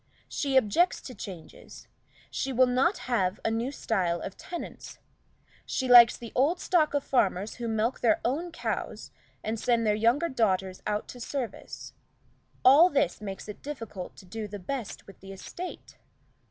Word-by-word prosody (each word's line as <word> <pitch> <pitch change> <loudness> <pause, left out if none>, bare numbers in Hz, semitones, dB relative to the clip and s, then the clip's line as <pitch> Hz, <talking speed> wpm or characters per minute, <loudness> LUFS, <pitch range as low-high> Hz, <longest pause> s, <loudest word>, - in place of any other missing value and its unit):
She 275 -2 0
objects 265 - +3
to 255 - -9
changes; 190 -6 -10 0.4
she 270 - -2
will 255 0 +5
not 255 +10 +2
have 200 -6 0
a 225 - +2
new 230 +4 -1
style 185 -10 -1
of 190 - -6
tenants; 350 -2 -8 0.7
she 260 - -2
likes 240 -2 +9
the 235 -2 -9
old 305 +8 +2
stock 315 -5 +2
of 285 - +1
farmers 200 -5 0
who 240 -1 -4
milk 225 +3 0
their 315 +7 +3
own 315 +8 -1
cows, 330 - -4 0.3
and 220 +1 -2
send 235 -1 +2
their 210 - +3
younger 235 +9 +2
daughters 190 - 0
out 210 0 -1
to 250 - -9
service: 245 0 -6 0.7
all 290 +8 +8
this 275 - 0
makes 195 -1 -6
it 210 - -8
difficult 225 -10 -7
to 190 - -14
do 215 +4 -5
the 205 0 -7
best 225 +4 -5
with 195 - -15
the 195 0 -11
estate. 350 - -8
235 Hz, 165 wpm, -28 LUFS, 205-275 Hz, 0.7 s, likes